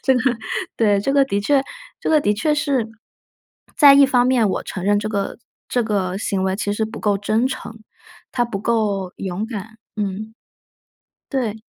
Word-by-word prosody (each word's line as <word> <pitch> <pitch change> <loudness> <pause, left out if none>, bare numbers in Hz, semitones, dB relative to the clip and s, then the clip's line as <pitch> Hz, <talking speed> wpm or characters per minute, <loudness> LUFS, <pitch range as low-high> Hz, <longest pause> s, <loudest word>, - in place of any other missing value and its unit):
这 265 - +3
个 250 - +1 0.6
对， 205 -3 +3
这 275 +7 -1
个 280 -1 +5
的 200 -6 -1
确 275 +4 +3 0.4
这 - - -2
个 305 -2 +4
的 210 - +2
确 300 +8 +1
是， 275 -6 0 0.9
在 285 -3 +9
一 280 0 +7
方 245 -2 +3
面 250 -4 +3
我 - - -2
承 185 - -6
认 205 +1 +3
这 215 - -3
个 200 -2 -2 0.3
这 245 -2 +1
个 195 -4 -1
行 195 -2 -1
为 190 0 0
其 205 0 -2
实 220 +1 -1
不 225 +1 -8
够 205 -2 +1
真 215 +4 +1
诚， 230 -4 -7 0.5
他 245 -2 +1
不 215 -4 -4
够 205 -5 0
勇 190 +2 -3
敢 220 -1 -7 0.2
嗯。 210 +2 -3 1.0
对。 225 -6 -2
220 Hz, 195 characters per minute, -21 LUFS, 200-255 Hz, 1.0 s, 在